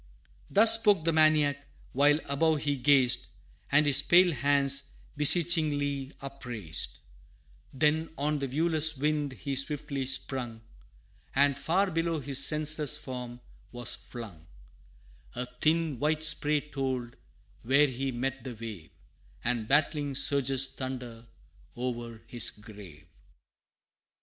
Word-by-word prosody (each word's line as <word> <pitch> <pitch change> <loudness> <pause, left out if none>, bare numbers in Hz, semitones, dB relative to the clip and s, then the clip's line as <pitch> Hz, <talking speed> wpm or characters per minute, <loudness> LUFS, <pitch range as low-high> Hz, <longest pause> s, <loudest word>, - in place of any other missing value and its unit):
Thus 225 +2 +8
spoke 205 -7 +2
the 165 - +1
maniac, 155 -3 +2 0.3
while 145 +3 +3
above 150 +2 0
he 145 -1 0
gazed, 130 -2 +2 0.4
And 145 +2 +4
his 145 -1 +3
pale 175 +4 +4
hands 140 0 +1 0.2
beseechingly 150 -3 +1
upraised; 125 -11 -5 0.7
Then 155 +4 0
on 150 +1 -1
the 140 - -3
viewless 160 +2 +1
wind 145 0 -1
he 135 +4 -5
swiftly 140 -1 -3
sprung, 125 -4 0 0.7
And 140 0 +3
far 185 +7 0
below 165 -1 -1
his 140 -1 +2
senseless 150 0 +2
form 125 -3 -8 0.3
was 120 -1 0
flung; 100 -10 -10 0.9
A 125 - -4 0.2
thin 155 -4 0
white 155 +2 0
spray 150 -1 +2
told 130 -4 -5 0.5
where 140 +5 +3
he 135 0 -3
met 130 +1 -4
the 125 -1 -7
wave, 105 -7 -9 0.5
And 115 -2 -2
battling 145 0 0
surges 135 -1 +3
thunder 125 -3 -7 0.5
o'er 120 -2 -6
his 120 -3 0
grave! 100 -8 -14
140 Hz, 115 wpm, -28 LUFS, 125-150 Hz, 0.9 s, Thus